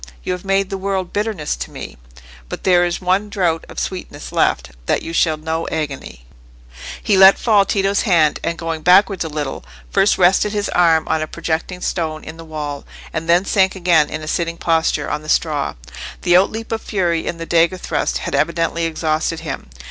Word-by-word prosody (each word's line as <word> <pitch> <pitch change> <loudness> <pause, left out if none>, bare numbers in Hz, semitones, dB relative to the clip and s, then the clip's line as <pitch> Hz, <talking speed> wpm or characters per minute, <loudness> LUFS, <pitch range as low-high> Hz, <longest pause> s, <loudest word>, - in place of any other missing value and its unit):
You - - -2
have 180 - -6
made 195 0 0
the 195 - -3
world 190 -2 -2
bitterness 205 -7 -2
to 65 0 -5
me; - - -8 0.5
but - - -6
there 180 -2 +4
is 175 +1 -3
one 190 +3 +1
draught 175 -5 0
of - - -12
sweetness 175 -6 -5
left—that - - 0
you 165 - -6
shall 160 -1 +2
know 160 +1 -3
agony." 140 - -5 0.8
He 200 - +3
let 190 +1 +8
fall 210 -4 +3
Tito's 195 0 +1
hand, 165 -8 +3
and 170 - -2
going 165 -1 -4
backwards 190 +2 +4
a 160 - -5
little, 150 -3 -4 0.3
first 195 +1 +3
rested 190 +3 +3
his 205 -1 -1
arm 165 -3 +3
on 160 0 0
a 155 - -2
projecting 170 +3 -3
stone 160 -4 -2
in 160 - -9
the 165 - -9
wall, 150 -3 -5 0.3
and 165 +1 -4
then 175 +3 +4
sank 190 -2 +2
again 170 -5 +3
in 155 0 -5
a - - -7
sitting 170 +1 -2
posture 165 -1 +1
on 150 - -2
the 155 - -10
straw. 150 -4 0 0.5
The 175 - +4
outleap 220 +5 +1
of 225 -1 -2
fury 170 -5 -1
in 170 - -3
the 165 - -6
dagger 170 +2 +2
thrust - - -1
had - - -5
evidently 165 0 0
exhausted 160 0 -1
him. 145 - -6
170 Hz, 195 wpm, -19 LUFS, 155-190 Hz, 0.8 s, let